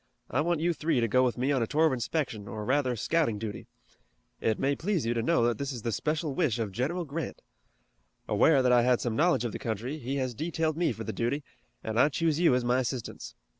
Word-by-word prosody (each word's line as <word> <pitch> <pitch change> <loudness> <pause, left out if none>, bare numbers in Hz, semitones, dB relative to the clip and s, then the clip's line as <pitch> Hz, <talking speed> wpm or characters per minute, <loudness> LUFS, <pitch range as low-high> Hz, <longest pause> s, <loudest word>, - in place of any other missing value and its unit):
"I 145 - +2
want 170 +1 0
you 175 +1 +2
three 155 -4 0
to 115 - +2
go 125 +4 +3
with 125 -1 0
me 130 +3 +1
on 135 -3 +1
a 115 - 0
tour 155 +5 +3
of 155 - +3
inspection 120 -4 -2
or 105 +1 -5
rather 130 -1 +1
scouting 130 -2 +1
duty. 105 -1 -6 0.7
It 110 -1 0
may 140 +1 +1
please 175 - -1
you 115 - +1
to 115 - 0
know 165 +2 +2
that 120 +1 0
it 140 0 -2
is 120 -4 -7
the 115 - -1
special 150 +5 -1
wish 130 -4 +1
of 110 -4 -2
General 155 - -2
Grant. 150 0 -5 0.8
Aware 140 -5 +4
that 125 - +3
I 120 -1 +6
had 125 0 +3
some 120 -3 -2
knowledge 145 -5 +2
of 120 - -2
the - - -6
country, 120 +4 -3
he 130 +2 -3
has 130 -2 -1
detailed 160 +3 -1
me 170 -2 +1
for 110 -1 -6
the 110 - -4
duty, 130 +5 -1 0.4
and 110 +1 -1
I 145 - +6
choose 160 +1 0
you 165 -7 +5
as 125 -1 0
my 125 +1 +2
assistants. 125 -1 -4
130 Hz, 245 wpm, -29 LUFS, 115-155 Hz, 0.8 s, I